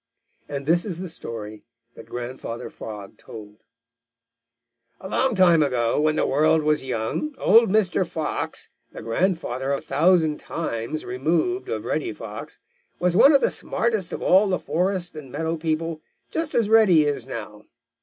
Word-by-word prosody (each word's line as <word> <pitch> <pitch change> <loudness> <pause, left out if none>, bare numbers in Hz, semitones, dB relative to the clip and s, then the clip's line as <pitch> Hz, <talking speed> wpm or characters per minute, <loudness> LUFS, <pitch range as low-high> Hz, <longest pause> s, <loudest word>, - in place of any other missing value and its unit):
And 140 -1 -4
this 170 +3 +3
is 180 -6 -5
the 185 - -5
story 110 -9 -8 0.3
that - - -13
Grandfather 120 -1 -6
Frog 105 -3 -9
told: 105 -1 -11 1.4
"A - - -8
long 255 +4 +1
time 175 -4 +5
ago, 125 -2 +1
when 155 0 +2
the - - +1
world 155 +3 +3
was 150 -1 +1
young, 130 - -3
old 230 -4 +5
Mr. 190 -3 +2
Fox, 160 -2 -3 0.2
the - - -9
grandfather 135 - -1
a 140 - 0
thousand 160 -1 +2
times 155 -1 -4
removed 170 - -1
of - - -3
Reddy - - -2
Fox, - - -8 0.4
was 180 -1 +1
one 275 +8 +7
of 280 -2 +5
the - - +2
smartest 220 -7 -1
of - - -5
all 195 +3 +5
the 185 -2 +1
forest 180 +4 -2
and 145 -4 -9
meadow 160 +3 -2
people, 160 0 -2 0.3
just 325 -1 -2
as 230 -3 +3
Reddy 210 -8 +6
is 140 -4 -2
now. 105 -4 -8
160 Hz, 155 wpm, -24 LUFS, 130-185 Hz, 1.4 s, one